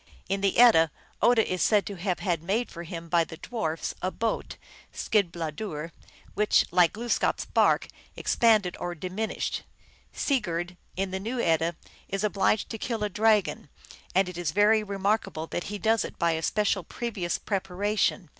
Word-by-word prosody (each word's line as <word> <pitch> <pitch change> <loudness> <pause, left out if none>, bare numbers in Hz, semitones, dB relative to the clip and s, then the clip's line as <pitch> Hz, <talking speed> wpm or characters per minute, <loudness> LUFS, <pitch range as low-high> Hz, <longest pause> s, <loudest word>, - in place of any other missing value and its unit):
In 195 +1 -1
the 195 -1 +1
Edda, 225 -10 +7 0.3
Odin 230 0 +5
is 185 -1 -2
said 210 +2 +3
to 205 - -5
have 180 0 -1
had 175 -5 0
made 205 +8 -1
for 170 - -7
him 170 0 -7
by 170 0 +3
the 160 0 -9
dwarfs 165 -9 -3
a 185 - 0
boat, 225 +3 -3 0.3
Skidbladuir, 170 -4 -2 0.4
which, 210 0 +3
like 175 -1 +4
Glooskap 235 +2 0
s - - -5
bark, - - +3 0.3
expanded 215 -6 +3
or 175 0 -3
dimin 185 +6 -3
ished. - - -2 0.5
Sigurd, 175 - -1 0.2
in 190 0 -2
the 190 - -2
New 230 +6 -3
Edda, 165 -3 +1 0.3
is 195 +1 -2
obliged 210 0 +1
to 225 - -5
kill 225 -2 -2
a 210 - 0
dragon, 210 -6 +2 0.5
and 190 0 +4
it 180 -1 -6
is 175 -4 -1
very 210 +5 +4
remarkable 200 -5 -1
that 175 - -4
he 205 - -4
does 220 +2 +2
it - - -8
by 170 -1 +2
a 160 0 -1
special 205 +1 +1
previous 190 -3 -3
preparation. 195 -1 -1
195 Hz, 170 wpm, -27 LUFS, 170-215 Hz, 0.5 s, Edda